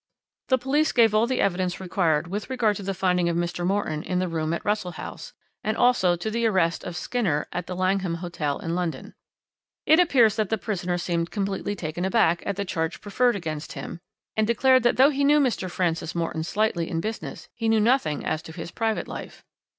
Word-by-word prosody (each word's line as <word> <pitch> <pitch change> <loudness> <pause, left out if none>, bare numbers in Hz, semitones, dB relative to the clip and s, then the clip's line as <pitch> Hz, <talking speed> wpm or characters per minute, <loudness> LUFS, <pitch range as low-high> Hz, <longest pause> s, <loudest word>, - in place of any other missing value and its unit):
"The 260 - +4
police 285 +5 +1
gave 225 -3 +4
all 215 +2 +3
the 260 - 0
evidence 185 -2 0
required 175 -4 +1
with 200 +7 -5
regard 235 -5 +1
to - - -7
the 195 0 -3
finding 180 -2 +1
of 170 - 0
Mr. 175 0 -2
Morton 180 -5 0
in 180 +2 -2
the 185 0 0
room 160 -2 -2
at 170 - -3
Russell 205 -4 -1
House - - -8 0.3
and 215 +1 -1
also 240 -8 +4
to 195 +6 -4
the 230 +1 +1
arrest 180 -5 +1
of 175 - -6
Skinner 190 -13 -1
at 180 0 -4
the 180 - -4
Langham 185 -1 0
Hotel 170 -4 -3
in 165 - -4
London. 175 -2 -3 0.7
It 315 +2 +6
appears 245 - +4
that 215 -3 0
the 220 - +1
prisoner 180 -4 -2
seemed 170 -1 -1
completely 200 0 -2
taken 175 -1 -4
aback 190 -4 +3
at 200 - -1
the 200 +1 -3
charge 165 -3 -2
preferred 240 +4 +1
against 155 -5 -5
him, 170 - -7 0.4
and 220 -1 +2
declared 255 +3 +4
that 240 +1 +2
though 270 +3 +6
he 280 0 0
knew 295 +2 +5
Mr. 235 -9 0
Francis 170 -2 -1
Morton 165 -1 -2
slightly 175 -2 0
in 165 - -1
business 220 +5 -5
he 225 -1 -1
knew 220 0 +4
nothing 220 - +1
as 155 - -1
to 160 - -10
his 165 0 -7
private 225 -1 -1
life. - - -8
190 Hz, 210 wpm, -25 LUFS, 170-225 Hz, 0.7 s, It